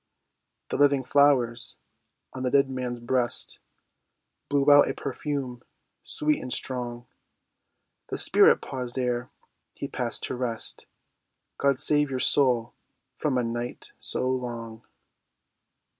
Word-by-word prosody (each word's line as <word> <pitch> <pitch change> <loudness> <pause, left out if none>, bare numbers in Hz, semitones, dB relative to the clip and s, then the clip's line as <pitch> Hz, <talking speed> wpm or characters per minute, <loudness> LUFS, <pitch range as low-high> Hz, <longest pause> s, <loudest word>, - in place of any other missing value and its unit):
The - - -2
living 140 -1 +4
flowers 125 -4 +2 0.6
on 130 - -6
the 130 - 0
dead 135 0 +3
man's 125 -2 -4
breast 120 0 -1 0.9
Blew 140 0 +3
out 145 0 +7
a - - -3
perfume 135 -3 -4 0.4
sweet 150 0 -1
and 130 - -6
strong. 120 -2 -3 1.0
The - - -3
spirit - - +5
paused 125 -1 -5
ere 125 -1 -1 0.5
he - - -5
passed - - -2
to - - -1
rest— 120 -3 -2 0.7
"God 140 -2 +2
save 150 -1 +2
your 130 - -2
soul 125 -3 +3 0.4
from 140 -4 -1
a 125 - +1
night 120 +1 -5
so - - -1
long." 120 -3 -4
130 Hz, 120 wpm, -26 LUFS, 120-140 Hz, 1.0 s, out